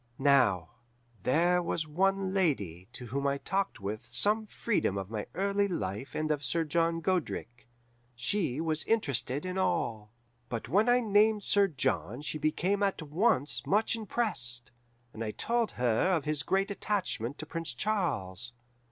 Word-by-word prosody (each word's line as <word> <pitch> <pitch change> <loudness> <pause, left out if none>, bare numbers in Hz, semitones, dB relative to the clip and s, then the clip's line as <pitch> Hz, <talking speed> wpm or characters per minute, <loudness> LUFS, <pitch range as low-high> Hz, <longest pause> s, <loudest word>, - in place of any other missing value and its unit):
"Now, 135 - +3 0.5
there 175 - +3
was 165 -2 0
one 190 +4 +1
lady 100 - 0
to 125 - -8
whom 140 +4 -2
I 140 0 +1
talked 195 +6 -2
with 105 +2 -5
some 215 +1 +2
freedom 205 - 0
of 95 +1 -5
my 105 -2 -4
early 200 +1 +1
life 130 - -4
and 155 0 0
of 145 -1 -1
Sir 165 +6 +1
John 165 +2 +1
Godric. 160 -9 -2 0.5
She 140 +2 0
was 160 -1 0
interested 145 - 0
in 185 +1 -2
all, 110 - -1 0.4
but 115 -2 -4
when 205 - +3
I 245 +1 +5
named 210 -1 +3
Sir 200 0 +4
John 135 - -1
she 155 - -3
became 180 +7 0
at 195 -4 0
once 155 - +1
much 215 +4 +2
impressed, 180 - -2 0.4
and 115 - -5
I 110 - -2
told 235 - 0
her 125 +7 +2
of 165 -5 +1
his 150 -1 +1
great 195 +5 0
attachment 185 - -2
to 155 - -6
Prince 165 0 -2
Charles. 125 - -1
160 Hz, 155 wpm, -30 LUFS, 125-195 Hz, 0.5 s, I